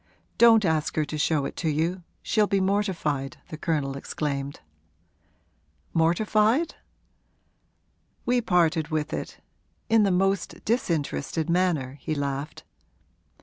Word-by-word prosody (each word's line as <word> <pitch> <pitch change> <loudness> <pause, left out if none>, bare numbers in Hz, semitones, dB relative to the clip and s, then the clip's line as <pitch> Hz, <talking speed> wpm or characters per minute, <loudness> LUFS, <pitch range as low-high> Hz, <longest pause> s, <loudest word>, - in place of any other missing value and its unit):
'Don't 225 -3 +7
ask 160 -2 0
her 155 - +1
to 155 - -6
show 150 -1 +1
it - - -5
to 165 - -1
you 165 +5 0 0.2
she'll 215 -2 +2
be 195 - +1
mortified!' 185 -8 -1
the 160 - -6
Colonel 150 -4 -1
exclaimed. 140 0 -4 1.3
'Mortified?' 215 - +2 1.5
'We 245 0 +2
parted 170 -6 +2
with 155 -2 -2
it - - -5 0.5
in 225 -1 +5
the 200 - +3
most 195 0 0
disinterested 165 - -1
manner,' 160 -7 0
he 155 - -2
laughed. 140 +1 -4
165 Hz, 115 wpm, -26 LUFS, 150-195 Hz, 1.5 s, Don't